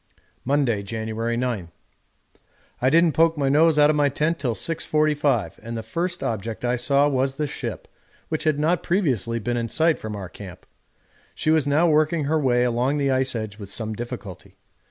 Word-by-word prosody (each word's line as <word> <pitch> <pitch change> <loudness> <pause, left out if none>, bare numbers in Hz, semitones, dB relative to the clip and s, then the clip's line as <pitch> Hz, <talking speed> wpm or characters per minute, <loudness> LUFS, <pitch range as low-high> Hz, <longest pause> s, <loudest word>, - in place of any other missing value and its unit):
Monday, 130 -6 +1
January 110 +2 -3
9. 120 -9 -2 1.1
I 130 - +4
didn't 165 +2 +4
poke 165 +2 +3
my 140 -2 +1
nose 155 +2 +4
out 150 0 +6
of - - -1
my 145 -1 +3
tent 155 +4 -1
till 125 -5 -1
6.45, 150 - 0
and 115 0 -6
the 110 - -5
first 175 +10 -3
object 110 +1 -3
I 120 +1 +1
saw 140 +4 +2
was 135 -1 0
the 150 - -1
ship, 145 - -6 0.4
which 155 0 -3
had 155 -2 +2
not 160 +3 +1
previously 130 - 0
been 120 +2 -2
in 115 -1 -1
sight 160 +6 +2
from 110 -1 -6
our 100 -2 -6
camp. 90 0 -11 0.7
She 155 - 0
was 155 -3 +2
now 155 +5 +3
working 155 0 +2
her 155 +3 +1
way 125 -4 +2
along 125 +4 +1
the 140 -2 +1
ice 130 -1 +1
edge 110 -2 -5
with 100 -2 -8
some 110 +1 -3
difficulty. 115 -4 -8
135 Hz, 185 wpm, -23 LUFS, 115-155 Hz, 1.1 s, out